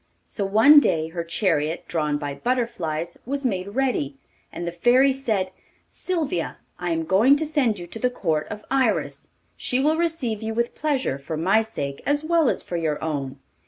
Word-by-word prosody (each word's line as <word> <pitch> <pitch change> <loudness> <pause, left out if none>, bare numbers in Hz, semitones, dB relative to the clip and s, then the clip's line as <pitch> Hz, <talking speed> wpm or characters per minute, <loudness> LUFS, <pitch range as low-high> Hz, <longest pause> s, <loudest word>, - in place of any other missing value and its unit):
So 85 - -4
one 220 +10 +7
day 160 - 0
her 170 0 -4
chariot, 165 -2 0
drawn 150 -3 0
by 145 -1 -4
butterflies, 170 - -2
was 275 +2 -3
made 190 -6 -1
ready, 250 - 0 0.4
and 175 - -5
the 170 - -2
Fairy 250 +9 +4
said: 215 -9 -1 0.4
'Sylvia, 310 - -2 0.2
I 175 - -2
am 165 -1 0
going 220 - +5
to 315 +2 -1
send 280 -8 +1
you 175 - -7
to 200 +6 -9
the 250 - +2
court 160 -10 -1
of 210 0 -7
Iris; 270 -1 0 0.3
she 250 - -1
will 305 +4 +2
receive 310 -11 -1
you 220 0 -3
with 235 +1 0
pleasure 270 - -1
for 155 +3 -5
my 190 +7 +3
sake 140 -11 -5
as 290 +1 +1
well 325 -3 +3
as - - -2
for 175 - -4
your 160 -3 -1
own. 140 -4 -3
210 Hz, 185 wpm, -24 LUFS, 165-265 Hz, 0.4 s, one